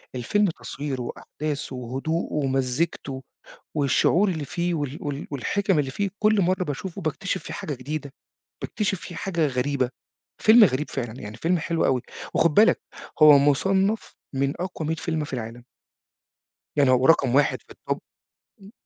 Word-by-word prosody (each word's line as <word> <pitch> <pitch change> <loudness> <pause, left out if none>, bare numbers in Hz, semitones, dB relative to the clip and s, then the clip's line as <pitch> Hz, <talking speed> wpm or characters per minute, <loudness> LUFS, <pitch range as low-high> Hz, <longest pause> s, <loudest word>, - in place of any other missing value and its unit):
الفيلم 205 - +1
تصويره 140 -4 -5
وأحداثه 145 +3 -5
وهدوءه 135 +7 -3
ومزيكته 135 0 -1 0.5
والشعور 165 +7 +3
اللي 160 -5 -3
فيه 175 +5 -2
وال 145 -3 -3
وال 145 0 -4
والحِكَم 190 +6 0
اللي 135 -2 -1
فيه 200 +7 -1
كل 215 -1 +4
مرة 185 +1 +1
باشوفه 175 +5 -5
باكتشف 185 +4 -2
فيه - - -7
حاجة 150 - -4
جديدة، 140 +2 -5 0.5
باكتشف 205 -3 -2
فيه 175 - -8
حاجة 170 -5 0
غريبة. 130 0 0 0.5
فيلم 220 +1 +8
غريب 150 -5 +2
فعلًا 120 -2 -5
يعني 105 +3 -8
فيلم 175 +6 +1
حلو 165 +1 0
أوي. 130 -2 +2 0.3
وخد 165 -2 +3
بالك 215 +7 +5 0.4
هو 150 -2 +10
مصنف 190 +9 +1 0.2
من 140 +1 +1
أقوى 165 -4 -4
100 160 - 0
فيلم 160 -1 -2
في 145 - -10
العالم. 120 0 -5 1.1
يعني 140 -3 +4
هو 130 0 +3
رقم 135 -5 +4
1 145 0 +3
في - - -15
الtop. - - -3 0.6
امم. 195 +2 -13
150 Hz, 155 wpm, -25 LUFS, 135-180 Hz, 1.1 s, هو